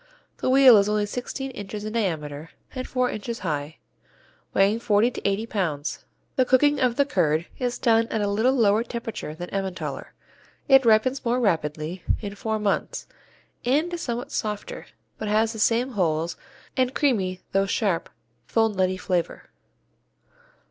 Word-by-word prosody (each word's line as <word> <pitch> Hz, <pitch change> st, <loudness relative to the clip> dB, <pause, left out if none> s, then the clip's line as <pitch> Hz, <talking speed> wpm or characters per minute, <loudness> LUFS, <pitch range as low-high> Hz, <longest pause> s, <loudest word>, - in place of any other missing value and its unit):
The -, -, -1 dB
"wheel" 260 Hz, -3 st, +8 dB
is 200 Hz, 0 st, +3 dB
only 210 Hz, 0 st, +1 dB
sixteen 255 Hz, +5 st, -5 dB
inches 205 Hz, -2 st, -7 dB
in 215 Hz, -, -4 dB
diameter 160 Hz, -8 st, -2 dB, 0.2 s
and 255 Hz, -1 st, -5 dB
four 255 Hz, -1 st, 0 dB
inches 230 Hz, +2 st, -5 dB
high, 150 Hz, -3 st, -3 dB, 0.7 s
weighing 200 Hz, +3 st, +3 dB
forty 225 Hz, +1 st, +3 dB
to -, -, -7 dB
eighty 200 Hz, +3 st, 0 dB
pounds. 165 Hz, -10 st, -3 dB, 0.3 s
The 260 Hz, -, +5 dB
cooking 285 Hz, +3 st, +3 dB
of 250 Hz, -3 st, +2 dB
the 280 Hz, -, +3 dB
curd 165 Hz, -, +1 dB
is 245 Hz, -1 st, -1 dB
done 225 Hz, -1 st, +3 dB
at 220 Hz, -, -2 dB
a 205 Hz, -, 0 dB
little 220 Hz, +6 st, +2 dB
lower 220 Hz, -2 st, +3 dB
temperature 230 Hz, -9 st, -6 dB
than 175 Hz, +2 st, -7 dB
Emmentaler, 190 Hz, -2 st, -4 dB, 0.5 s
it 270 Hz, -2 st, +6 dB
ripens 230 Hz, +4 st, +3 dB
more 245 Hz, 0 st, +1 dB
rapidly 160 Hz, -4 st, -1 dB, 0.2 s
in 205 Hz, -2 st, -6 dB
four 220 Hz, +1 st, -2 dB
months 210 Hz, -2 st, -1 dB, 0.6 s
and 300 Hz, +8 st, +1 dB
is 345 Hz, -, -3 dB
somewhat 245 Hz, +3 st, -4 dB
softer, 210 Hz, -6 st, -4 dB, 0.3 s
but 215 Hz, -, -3 dB
has 220 Hz, +2 st, +2 dB
the 220 Hz, -, -7 dB
same 235 Hz, +4 st, +2 dB
holes 165 Hz, -5 st, 0 dB, 0.4 s
and 255 Hz, 0 st, +1 dB
creamy 195 Hz, -11 st, +1 dB
though 195 Hz, 0 st, +2 dB
sharp, 195 Hz, -5 st, 0 dB, 0.4 s
full 225 Hz, -1 st, +2 dB
nutty 185 Hz, -2 st, 0 dB
flavor. 180 Hz, -2 st, -2 dB
215 Hz, 155 wpm, -25 LUFS, 185-245 Hz, 0.7 s, wheel